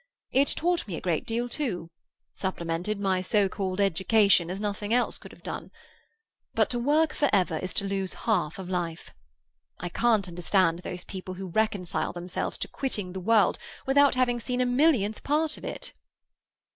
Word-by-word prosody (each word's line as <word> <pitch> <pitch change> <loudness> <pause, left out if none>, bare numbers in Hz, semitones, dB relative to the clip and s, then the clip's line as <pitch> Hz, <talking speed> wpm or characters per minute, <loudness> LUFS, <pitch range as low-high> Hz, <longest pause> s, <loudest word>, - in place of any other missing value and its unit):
It 275 +2 +4
taught 345 -2 0
me 185 - -4
a - - -4
great 170 -4 -1
deal, 235 +2 -1
too; 190 - -3 0.4
supplemented 180 +2 -2
my 190 -2 +1
so 200 +1 +2
called 190 0 -3
education 195 -1 +4
as 185 +2 -3
nothing 205 0 -3
else 245 - +1
could - - -12
have - - -17
done. - - -5 0.9
But - - +3
to 240 - -1
work 300 +5 +3
for 290 - +2
ever 180 -5 +2
is 185 - -4
to 200 - 0
lose 195 -1 -2
half 180 -9 +1
of 190 -2 -6
life. 175 -3 -3 0.7
I 175 - -4
can't 215 0 +2
understand 175 0 +2
those 180 0 -5
people 185 -1 -7
who 190 0 -6
reconcile 205 -3 0
themselves 175 +1 -3
to - - -2
quitting 205 -9 -3
the 190 - -4
world 210 +1 +3 0.3
without 280 +1 +5
having 245 -1 +2
seen 250 +1 -2
a 250 - +3
millionth 245 -5 +2
part 310 +2 +1
of - - -13
it." - - -5
200 Hz, 175 wpm, -27 LUFS, 180-240 Hz, 0.9 s, without